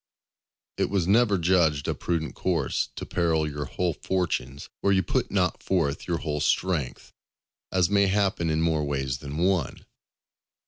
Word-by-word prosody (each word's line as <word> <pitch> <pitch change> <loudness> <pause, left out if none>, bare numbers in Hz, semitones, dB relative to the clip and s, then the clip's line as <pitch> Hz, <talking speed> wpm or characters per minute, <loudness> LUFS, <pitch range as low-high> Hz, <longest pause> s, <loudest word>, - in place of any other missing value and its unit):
It - - 0
was 95 -4 0
never 105 0 +4
judged 80 -5 +2
a - - +1
prudent 85 -2 -2
course 85 -7 -1
to - - -5
peril 80 -3 +1
your 75 0 -4
whole 90 +5 -1
fortunes 75 -6 -2
where 100 - +2
you 95 -1 +3
put - - -1
not 90 -2 0
forth 80 -7 -1
your 85 -2 0
whole 75 0 -3
strength; 80 -6 -1 0.6
as 90 -2 +3
may 100 +1 +3
happen 95 -4 +1
in 80 0 +1
more 80 -2 +1
ways 65 -3 -2
than 70 +1 -6
one. 90 0 0
85 Hz, 155 wpm, -26 LUFS, 75-95 Hz, 0.6 s, never